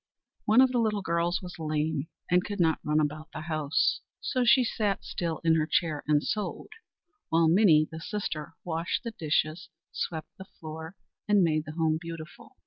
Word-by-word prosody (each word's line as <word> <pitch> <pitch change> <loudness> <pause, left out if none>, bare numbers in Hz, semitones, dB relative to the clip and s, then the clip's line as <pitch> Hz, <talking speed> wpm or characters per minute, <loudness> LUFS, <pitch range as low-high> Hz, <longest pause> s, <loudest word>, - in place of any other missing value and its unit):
One 220 +4 +6
of 260 -1 +5
the 245 - +1
little 210 -3 0
girls 170 +2 0
was 180 -1 -8
lame, 155 -1 -1 0.2
and 180 +1 +3
could 205 -1 -5
not 160 -2 +3
run 150 +1 +2
about 155 +1 -2
the 155 - -5
house; 155 - +1 0.2
so 255 -2 0
she 245 +2 +6
sat 210 -4 -1
still 165 -2 -2
in 165 -1 +4
her 155 -1 +1
chair, 155 -2 0
and 150 -1 +3
sewed, 210 - -3 0.6
while 165 0 +4
Minnie, 160 -4 +5
the 160 - -6
sister, 165 -5 -4
washed 165 +4 -2
the 230 - -4
dishes, 155 -2 -1 0.2
swept 160 -2 -4
the 190 - -8
floor, 160 +2 -7 0.3
and 205 -2 +5
made 155 -2 +1
the 155 - -7
home 160 -1 +1
beautiful. 165 -2 -9
165 Hz, 180 wpm, -28 LUFS, 155-195 Hz, 0.6 s, One